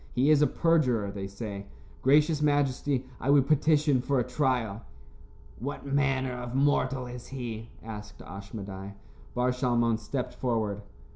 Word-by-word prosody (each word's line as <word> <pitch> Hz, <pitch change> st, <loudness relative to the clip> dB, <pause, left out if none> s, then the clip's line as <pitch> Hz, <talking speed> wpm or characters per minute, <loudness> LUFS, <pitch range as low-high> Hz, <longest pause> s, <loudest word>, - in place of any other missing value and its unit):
He 135 Hz, +5 st, +4 dB
is 150 Hz, -1 st, +5 dB
a 150 Hz, -, +6 dB
perjurer, 125 Hz, -, +2 dB
they 100 Hz, -1 st, -5 dB
say. 100 Hz, 0 st, -6 dB, 0.3 s
Gracious 150 Hz, +3 st, +4 dB
majesty, 145 Hz, -2 st, +1 dB
I 135 Hz, -, -2 dB
would 140 Hz, -2 st, +6 dB
petition 150 Hz, -3 st, +3 dB
for 135 Hz, +2 st, 0 dB
a -, -, +2 dB
trial." 125 Hz, -5 st, 0 dB, 0.8 s
"What 140 Hz, +6 st, -5 dB
manner 135 Hz, -2 st, +1 dB
of 125 Hz, 0 st, -5 dB
mortal 135 Hz, -2 st, +2 dB
is 125 Hz, 0 st, -8 dB
he?" 115 Hz, -4 st, -6 dB
asked 105 Hz, -2 st, -8 dB
Ashmedai. 100 Hz, +1 st, -8 dB, 0.4 s
Bar 125 Hz, +1 st, +2 dB
Shalmon 120 Hz, -3 st, +1 dB
stepped 125 Hz, +3 st, -3 dB
forward. 110 Hz, -5 st, -1 dB
125 Hz, 140 wpm, -29 LUFS, 110-140 Hz, 0.8 s, a